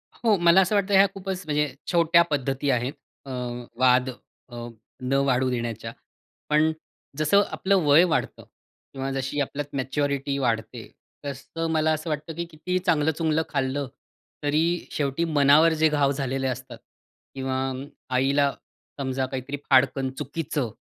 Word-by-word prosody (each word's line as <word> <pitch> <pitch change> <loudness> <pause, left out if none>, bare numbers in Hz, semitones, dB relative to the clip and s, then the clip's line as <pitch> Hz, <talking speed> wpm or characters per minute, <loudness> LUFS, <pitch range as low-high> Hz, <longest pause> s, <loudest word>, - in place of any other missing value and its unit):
हो, 225 -3 +2
मला 175 +2 +6
असं 190 +3 +1
वाटतं, 200 0 +1
ह्या 195 +1 +7
खूपच 190 -1 -4
म्हणजे 150 -2 0 0.2
छोट्या 170 0 +5
पद्धती 135 0 -1
आहेत 125 +2 0 0.3
अ, 135 - -8 0.5
वाद 130 0 +4 0.4
अ, 120 0 -7 0.3
न 125 +1 -2
वाढू 130 -1 +2
देण्याच्या. 115 -2 -3 0.6
पण 155 +1 +4 0.5
जसं 155 +7 +4
आपलं 195 +1 +1
वय 145 +4 +7
वाढतं 170 -3 -1 0.5
किंवा 135 0 -3
जशी 135 +2 -2
आपल्यात 145 +1 -4
मॅच्युरिटी 140 +1 -1
वाढते, 115 -2 -2 0.4
तसं 145 +4 -4
मला 155 0 +2
असं 155 +1 -4
वाटतं, 155 +2 -3
की 170 +1 -3
किती 170 +4 -2
चांगलं-चुंगलं 160 0 +2
खाल्लं 135 -1 -1 0.6
तरी 150 +2 +2 0.3
शेवटी 145 +3 -1
मनावर 150 +4 +6
जे 160 - +6
घाव 145 -2 +2
झालेले 135 -1 -2
असतात, 130 -1 -5 0.6
किंवा 130 -1 -2 0.6
आईला 140 +2 +3 0.5
समजा 130 -1 -1
काहीतरी 130 +2 -5
फाडकन 135 0 +3
चुकीचं 145 -3 -3
140 Hz, 135 wpm, -25 LUFS, 130-160 Hz, 0.6 s, ह्या